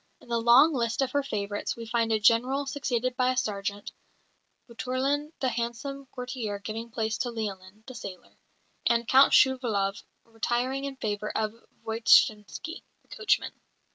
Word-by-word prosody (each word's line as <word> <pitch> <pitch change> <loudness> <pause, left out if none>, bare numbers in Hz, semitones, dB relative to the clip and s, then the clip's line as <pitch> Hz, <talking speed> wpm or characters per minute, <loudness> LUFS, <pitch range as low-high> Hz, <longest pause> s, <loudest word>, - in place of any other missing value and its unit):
In - - -19
the 235 -1 +1
long 255 +7 +6
list 235 0 0
of 260 - -2
her 285 - +1
favourites 205 -6 -3
we 230 - -8
find 225 0 0
a 220 - +2
General 245 +6 +3
succeeded 255 -3 -2
by 255 -1 +2
a 255 - -3
Sergeant; 205 -4 -2 0.8
Boutourlin, 265 +5 -2
the 260 - +2
handsome 240 +4 -4
courtier, 250 -5 -5
giving 225 +3 -6
place 220 -1 -2
to 245 - -1
Lialin, 210 -3 -6
the 255 - -9
sailor; 195 -7 -9 0.5
and 235 -1 +2
Count 265 +2 +6
Shouvalov 225 -7 +3 0.2
retiring 240 +4 -2
in 275 -1 -5
favour 210 -3 -3
of 215 -1 -1 0.3
Voytshinsky, 220 - +2 0.2
the - - -35
coachman. 430 -3 +1
235 Hz, 150 wpm, -27 LUFS, 215-260 Hz, 0.8 s, long